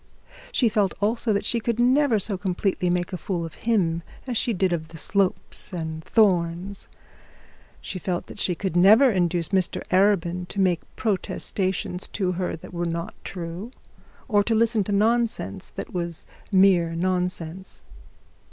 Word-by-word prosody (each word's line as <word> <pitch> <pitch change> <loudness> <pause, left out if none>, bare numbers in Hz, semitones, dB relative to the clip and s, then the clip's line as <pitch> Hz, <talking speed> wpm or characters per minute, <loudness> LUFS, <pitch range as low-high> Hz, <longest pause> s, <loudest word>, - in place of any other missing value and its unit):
She 255 - +3
felt 205 -3 +1
also 220 +3 +1
that 200 - 0
she 235 - +1
could 230 0 -2
never 255 0 +4
so 200 0 0
completely 185 -1 -1
make 175 +1 -1
a - - -1
fool 175 0 -3
of 165 - -8 0.2
him 170 -7 +2 0.2
as 250 -2 -3
she 235 - +2
did 185 -3 +1
of 160 -2 -3
the 165 - -11
Slopes 195 +3 0
and 160 -3 -4
the - - -22
Thornes. 185 -2 +1 0.9
She 185 - -5
felt 180 -1 -2
that - - -11
she 180 - +1
could 190 -1 -3
never 215 +9 +7
induce 175 -3 0
Mr 190 -3 0
Arabin 180 -2 +2
to 200 - -5
make 180 -3 +2
protestations 190 -2 -2
to 190 -3 0
her 180 0 -2
that 165 - -12
were 175 0 -2
not 170 +5 -3
true, 175 +4 -6 0.6
or 205 -5 +3
to 225 +2 +1
listen 225 -1 +3
to 205 - -2
nonsense 220 - 0
that - - -8
was 170 -2 -4 0.3
mere 185 -4 +4
nonsense. 180 0 -3
185 Hz, 160 wpm, -24 LUFS, 175-210 Hz, 0.9 s, never